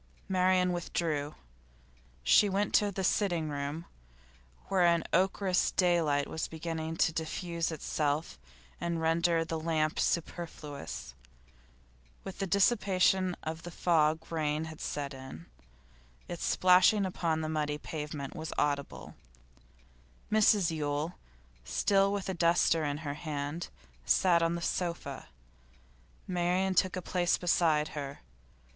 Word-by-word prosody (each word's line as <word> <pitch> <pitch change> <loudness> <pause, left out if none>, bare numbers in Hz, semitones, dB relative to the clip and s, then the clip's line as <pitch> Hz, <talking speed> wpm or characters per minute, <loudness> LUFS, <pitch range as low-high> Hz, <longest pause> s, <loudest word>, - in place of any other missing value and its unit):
Marian 185 -1 +2
withdrew. 155 -4 -2 0.9
She 205 - +5
went 200 +1 0
to 205 -1 +3
the 190 0 -3
sitting 175 -5 +1
room, 145 +3 -4 0.8
where 190 -2 +1
an 170 -1 +4
ochreous 190 +1 +2
daylight 165 -6 +2
was 160 - -3
beginning 160 0 -4
to 160 - +2
diffuse 165 +1 -3
itself 150 0 -2 0.4
and 170 0 -2
to - - -2
render 165 +1 +2
the 160 0 -3
lamp 155 -1 0
superfluous. 150 - -3 1.1
With 195 - -8
the 195 - -1
dissipation 190 -2 +3
of 160 +1 -4
the 175 - -8
fog 160 -2 +1
rain 155 -1 -1
had 160 -1 -9
set 145 -1 -4
in; 130 -11 -10 0.8
its 175 - -6
splashing 185 +3 +5
upon 165 -3 -1
the 155 - -2
muddy 150 -1 -1
pavement 150 -2 -6
was 160 0 -5
audible. 145 -1 -2 1.2
Mrs 210 -4 +4
Yule, 150 +1 -2 0.5
still 195 - +2
with 200 -1 -3
a 190 - -1
duster 170 -2 +3
in 145 -1 -1
her 145 - -2
hand, 150 +1 -4 0.3
sat 175 - +3
on 165 0 +1
the 170 - -4
sofa. 175 -1 -3 1.0
Marian 180 +1 0
took 185 +1 +2
a 185 - -4
place 175 0 +1
beside 160 -4 +2
her. 140 -2 -6
165 Hz, 125 wpm, -31 LUFS, 155-180 Hz, 1.2 s, She